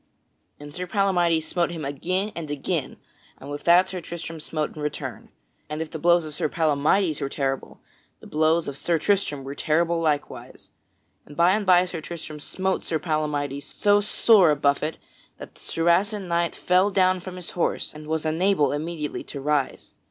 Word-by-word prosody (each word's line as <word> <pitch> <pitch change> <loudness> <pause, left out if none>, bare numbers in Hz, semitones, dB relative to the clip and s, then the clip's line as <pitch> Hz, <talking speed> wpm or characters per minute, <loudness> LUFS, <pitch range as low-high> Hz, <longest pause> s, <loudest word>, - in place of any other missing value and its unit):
And 145 0 -10
Sir 180 +2 -5
Palamydes 175 -5 +2
smote 170 +2 0
him 165 -4 -5
again 185 +9 -2
and 165 -3 -5
again; 145 -2 -3 0.4
and 140 - -9
with 145 - -6
that 175 +2 +6
Sir 185 -1 -5
Tristram 165 -1 -7
smote 155 0 -3
in 155 - -7
return. 150 0 -5 0.4
And 150 0 -4
if 160 -1 -4
the 160 - -5
blows 170 +1 +4
of 155 - -8
Sir 150 - -1
Palamydes 155 +2 +1
were 140 - -1
terrible, 135 -1 -3 0.4
the - - -15
blows 160 +2 +1
of 140 -1 -4
Sir 170 -1 +1
Tristram 160 -6 0
were 135 +1 -6
terrible 165 +3 +1
likewise. 150 -2 -3 0.6
Then 145 - -12
by 170 +3 +5
and 205 0 0
by 180 -1 +6
Sir 170 -2 -5
Tristram 155 -2 -8
smote 190 +5 -2
Sir 160 - -1
Palamydes 150 -3 -2
so 205 0 +2
sore 205 -3 +5
a 150 - +4
buffet 145 +2 0 0.4
that - - -10
the - - -17
Saracen 185 +4 +1
knight 170 0 0
fell 185 +3 +3
down 185 -1 +3
from 185 0 -8
his 180 -2 -5
horse 175 - -1
and 150 0 -10
was 160 0 -2
unable 160 0 +2
immediately 155 0 -4
to - - -7
arise. 145 -1 -1
165 Hz, 180 wpm, -24 LUFS, 150-180 Hz, 0.6 s, that